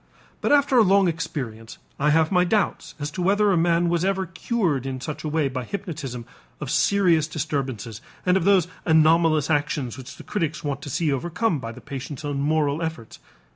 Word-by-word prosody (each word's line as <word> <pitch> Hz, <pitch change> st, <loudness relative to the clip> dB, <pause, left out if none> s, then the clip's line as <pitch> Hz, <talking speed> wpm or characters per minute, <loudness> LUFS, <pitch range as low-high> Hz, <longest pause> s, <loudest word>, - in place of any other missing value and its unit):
But -, -, 0 dB
after 280 Hz, -3 st, +4 dB
a -, -, +7 dB
long 195 Hz, -1 st, +4 dB
experience, 130 Hz, -9 st, -4 dB, 0.2 s
I 150 Hz, +2 st, +2 dB
have 160 Hz, +2 st, +3 dB
my 180 Hz, -2 st, +4 dB
doubts 205 Hz, +2 st, -1 dB
as 145 Hz, 0 st, -4 dB
to 180 Hz, -, -5 dB
whether 205 Hz, +3 st, +3 dB
a -, -, +3 dB
man 170 Hz, 0 st, +2 dB
was 170 Hz, 0 st, +1 dB
ever 190 Hz, 0 st, 0 dB
cured 175 Hz, -, -1 dB
in 130 Hz, -1 st, -4 dB
such 150 Hz, +3 st, -6 dB
a 155 Hz, -, -2 dB
way 155 Hz, -1 st, +1 dB
by 130 Hz, -1 st, -4 dB
hypnotism 145 Hz, -, -6 dB, 0.3 s
of -, -, -4 dB
serious 175 Hz, -6 st, +3 dB
disturbances 135 Hz, -8 st, -4 dB, 0.2 s
and 180 Hz, 0 st, +3 dB
of 190 Hz, -, +2 dB
those 190 Hz, -3 st, +4 dB, 0.2 s
anomalous 160 Hz, -1 st, +4 dB
actions 145 Hz, -4 st, -1 dB
which 130 Hz, +1 st, -10 dB
the -, -, -12 dB
critics 165 Hz, -5 st, -3 dB
want 145 Hz, -1 st, -3 dB
to 145 Hz, -, -7 dB
see 155 Hz, +1 st, 0 dB
overcome 175 Hz, -, -1 dB
by 115 Hz, -2 st, -6 dB
the -, -, -12 dB
patient's 140 Hz, +2 st, -7 dB
own 145 Hz, -1 st, -2 dB
moral 150 Hz, +1 st, +1 dB
efforts. 160 Hz, -9 st, -5 dB
160 Hz, 195 wpm, -24 LUFS, 140-180 Hz, 0.3 s, a